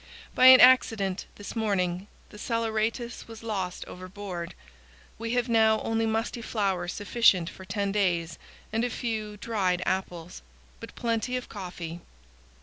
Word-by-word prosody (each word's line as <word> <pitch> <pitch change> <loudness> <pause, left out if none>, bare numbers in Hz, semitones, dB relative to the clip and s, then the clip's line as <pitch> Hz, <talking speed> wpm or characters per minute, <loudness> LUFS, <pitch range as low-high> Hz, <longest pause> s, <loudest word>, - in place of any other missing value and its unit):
By 255 - +6
an 260 0 +10
accident, 225 -7 +4
this 205 - -8
morning, 195 -4 -1 0.2
the 210 - -12
saleratus 230 +1 -2
was 225 0 -11
lost 190 -5 -3
overboard. 185 -1 -7 0.6
We 230 +1 -3
have 245 0 +1
now 220 -2 +4
only 225 0 0
musty 225 +2 -2
flour 195 -6 -1
sufficient 195 -2 +2
for 190 - -12
ten 200 0 -2
days 175 -5 0 0.3
and 225 +1 +1
a 245 - 0
few 220 -3 -4
dried 190 -5 -1
apples, 180 -2 -3 0.4
but 230 - -10
plenty 235 +1 -1
of 250 - -7
coffee. 175 -4 -7
210 Hz, 140 wpm, -27 LUFS, 185-230 Hz, 0.6 s, an